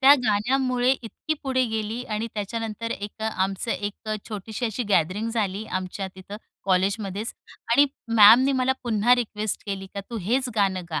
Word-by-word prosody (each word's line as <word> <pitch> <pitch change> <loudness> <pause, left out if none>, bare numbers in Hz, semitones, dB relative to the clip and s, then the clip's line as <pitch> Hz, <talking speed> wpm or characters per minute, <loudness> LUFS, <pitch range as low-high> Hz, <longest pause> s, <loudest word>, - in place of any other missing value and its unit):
त्या 275 +1 +9
गाण्यामुळे 250 +4 +2
इतकी 265 +5 -2
पुढे 260 -2 +1
गेली 220 +1 -3
आणि 215 -1 -3
त्याच्यानंतर 225 +2 -4
एक 205 +1 -6
आमचं 195 0 -1
एक 205 +1 -4 0.2
छोटीशी 220 +3 -4
अशी 225 +2 -2
गॅदरिंग 200 +4 +1
झाली, 210 -2 -1
आमच्या 185 0 -3
तिथं 190 +2 -9 0.3
कॉलेजमध्येच 195 +2 0 0.4
आणि 285 +4 +6 0.3
मॅमनी 235 +6 +8
मला 255 +1 +3
पुन्हा 235 0 +4
रिक्वेस्ट 215 -4 -3
केली 195 -1 -4
का 200 - -3
तू 235 - -4
हेच 250 +7 0
गाणं 195 -3 +1
गा 155 - -1
215 Hz, 155 wpm, -25 LUFS, 200-245 Hz, 0.4 s, त्या